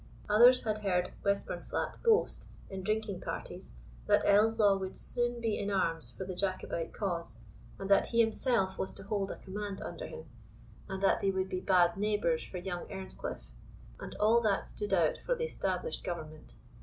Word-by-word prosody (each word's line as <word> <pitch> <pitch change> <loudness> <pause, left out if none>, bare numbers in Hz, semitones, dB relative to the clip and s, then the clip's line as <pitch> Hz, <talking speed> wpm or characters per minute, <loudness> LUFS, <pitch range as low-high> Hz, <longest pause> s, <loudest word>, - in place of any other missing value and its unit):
Others 240 +4 +7
had 215 -1 -1
heard 180 -3 0
Westburnflat 200 0 -2
boast, 455 -2 +2 0.2
in 190 -1 -4
drinking 215 -1 -1
parties, - - -6 0.3
that - - +4
Ellieslaw 210 -1 +5
would 190 0 -5
soon 240 0 -2
be 225 -2 -1
in 205 - -2
arms 165 -5 0
for 190 - -7
the 185 - -4
Jacobite 185 -3 -2
cause, 170 - -3 0.4
and 195 - -5
that 195 - +5
he 235 - 0
himself 225 -3 +2
was 190 - -2
to - - -10
hold 200 -1 -1
a - - -4
command 200 +1 -5
under 170 - -6
him, 160 - -9 0.6
and 190 0 -4
that 195 - +3
they 195 - +2
would 190 0 -1
be 185 -1 -2
bad 180 -2 +4
neighbours 205 -6 +1
for 185 - -7
young 175 -1 -4
Earnscliff; 190 - -5 0.6
and - - -7
all 225 +3 +4
that 205 -4 +1
stood 205 -1 -5
out 170 -5 +3
for - - +1
the 475 0 -1
established 480 0 -2
government. 155 -3 -6
195 Hz, 175 wpm, -32 LUFS, 185-215 Hz, 0.6 s, Others